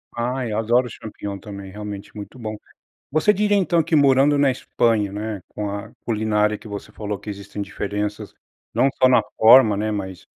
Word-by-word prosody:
Ai 125 +1 -2
eu 105 - -1
adoro 120 +3 +2
o - - -9
Champignon 100 -2 -7
também, 100 -2 -9
realmente 105 0 -7
é - - -37
muito 105 +4 -9
bom. 110 -3 -5 0.6
Você 155 +8 +4
diria 205 +1 +2
então 175 -4 +3
que 160 - 0
morando 140 0 +5
na 140 -1 +4
Espanha, 115 -5 0
né, 105 -1 -4
com 105 -1 -5
a 100 0 -6
culinária 105 -1 +1
que 110 - -13
você 105 0 -7
falou 105 -1 -4
que 105 - -10
existem 100 0 -6
diferenças, 105 +1 -4 0.4
não 135 - +3
só 130 - +5
na 125 -1 +5 0.2
forma, 110 -2 +7
né, 110 +1 -1
mas, 95 -3 -5
110 Hz, 190 wpm, -22 LUFS, 105-130 Hz, 0.6 s, forma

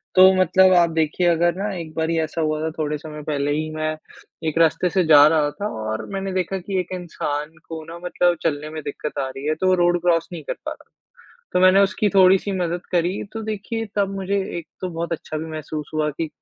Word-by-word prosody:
तो 185 0 +9
मतलब 185 +1 +5
आप 170 -1 +5
देखिए 160 +2 0
अगर 170 0 +3
ना 200 +2 -2
एक 165 -3 -7
बारी 165 +1 0
ऐसा 160 +1 -2
हुआ 155 -1 0
था 160 - -1
थोड़े 150 -1 -1
समय 150 0 -9
पहले 145 -1 0
ही 155 +1 -1
मैं 155 0 -1 0.6
एक 155 - -2
रास्ते 165 +2 +3
से 185 +1 +2
जा 150 -2 +8
रहा 155 -2 +2
था 200 +8 -4
और 110 0 -3
मैंने 195 0 -3
देखा 185 +1 -1
कि 190 +1 -2
एक 180 - -4
इंसान 155 -3 -4
को 160 -1 -6
ना 170 +1 -9
मतलब 175 0 +2
चलने 150 -2 -1
में 155 0 -6
दिक्कत 145 +1 -5
आ 135 - -1
रही 135 +2 -8
है, 155 - +1
तो 185 +3 +2
रोड 175 0 +2
क्रॉस 170 -1 +2
नहीं 160 - -7
कर - - -3
पा - - -3
रहा। - - -12 0.6
तो 180 - +2
मैंने 185 +1 +6
उसकी 200 +1 +2
थोड़ी-सी 190 +1 +5
मदद 175 0 -2
करी 175 +2 +1
तो 225 - -5
देखिए 220 +1 -4
तब 195 -1 +1
मुझे 195 +1 -1 0.2
एक 165 - -8
तो 185 - -2
बहुत 170 0 -4
अच्छा 155 -1 -4
भी 160 - -5
महसूस 155 -1 -6
हुआ 155 -1 +1
कि 160 +2 -4
165 Hz, 225 wpm, -22 LUFS, 155-185 Hz, 0.6 s, तो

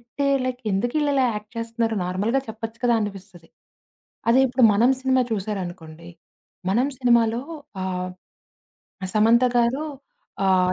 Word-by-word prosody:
ఇట్టే 240 +4 -4 0.2
like 255 -1 -3
ఎందుకీళ్ళిలా 265 +6 +1
act 210 0 -7
చేస్తున్నారు 230 0 -1
నార్మల్‌గా 205 +9 0
చెప్పచ్చు 225 +1 -7
కదా 240 -1 +3
అనిపిస్తది. 195 -5 -7 0.8
అది 250 +3 +6
ఇప్పుడు 250 -1 +2
'మనం' 240 +6 +4
సినిమా 260 -1 +2
చూసారనుకోండి. 175 -5 -5 0.6
'మనం' 250 +7 +2
సినిమాలో 235 -2 +3 0.4
ఆహ్, 185 -1 -3 1.0
'సమంత' 230 +3 +4
గారు. 245 +6 +2 0.6
ఆహ్, 185 -1 +3
230 Hz, 110 wpm, -23 LUFS, 195-250 Hz, 1.0 s, అది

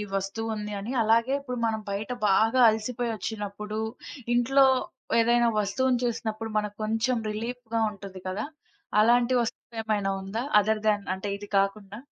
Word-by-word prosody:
వస్తువుంది 210 +2 -3
అని. 210 +5 -5
అలాగే 230 +4 +3
ఇప్పుడు 250 -3 -5
మనం 220 -1 -1
బయట 205 +4 -3 0.2
బాగా 225 +6 +3
అలసిపోయి 230 +2 -2
ఒచ్చినప్పుడు 210 0 -5 0.5
ఇంట్లో 270 +3 +5 0.5
ఏదైనా 235 +1 +4
వస్తువుని 250 +5 +1
చూసినప్పుడు. 225 -1 -3
మనకు 210 -1 -2
కొంచెం 225 +3 +1
రిలీఫ్‌గా 230 +1 -3
ఉంటుంది 195 -2 -10
కదా! 195 +6 -2 0.6
అలాంటి 240 +3 +4
వస్తువేమైనా 220 -4 -2
ఉందా? 220 +5 -3 0.2
అదర్‌ 215 +1 0
దెన్ 205 -2 +2
అంటే 190 +2 -6
ఇది 205 0 -10
కాకుండా? 200 +1 -2
220 Hz, 130 wpm, -27 LUFS, 205-235 Hz, 0.6 s, ఇంట్లో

